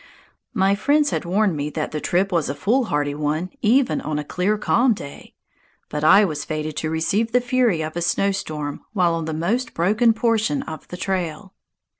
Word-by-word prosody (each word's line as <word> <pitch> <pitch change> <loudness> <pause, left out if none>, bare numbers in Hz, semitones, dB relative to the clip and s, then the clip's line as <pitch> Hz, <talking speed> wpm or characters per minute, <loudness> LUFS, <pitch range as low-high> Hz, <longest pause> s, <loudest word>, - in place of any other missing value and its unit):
My 195 -2 +3
friends 290 +8 +2
had - - -2
warned 195 0 +1
me 145 0 -2
that 155 0 -4
the 150 - -4
trip 190 +3 +1
was 170 -4 0
a 140 - -3
foolhardy 185 - 0
one 155 +4 -2
even 250 +4 +2
on 150 0 -3
a 150 - -2
clear, 185 +7 0
calm 235 +3 +2
day, 140 -6 -11 0.5
but 150 0 -4
I 200 +6 +7
was 150 -5 -3
fated 155 -1 -4
to 155 - -2
receive 200 +8 0
the 250 - +5
fury 245 -9 +1
of 155 +1 -5
a 175 - -2
snowstorm 160 -6 -1
while 180 -5 +2
on 165 -1 -2
the 160 - -3
most 220 +10 -1
broken 215 +7 +3
portion 220 - 0
of 155 -2 -8
the 180 - -8
trail. 185 0 -3
180 Hz, 190 wpm, -22 LUFS, 155-215 Hz, 0.5 s, I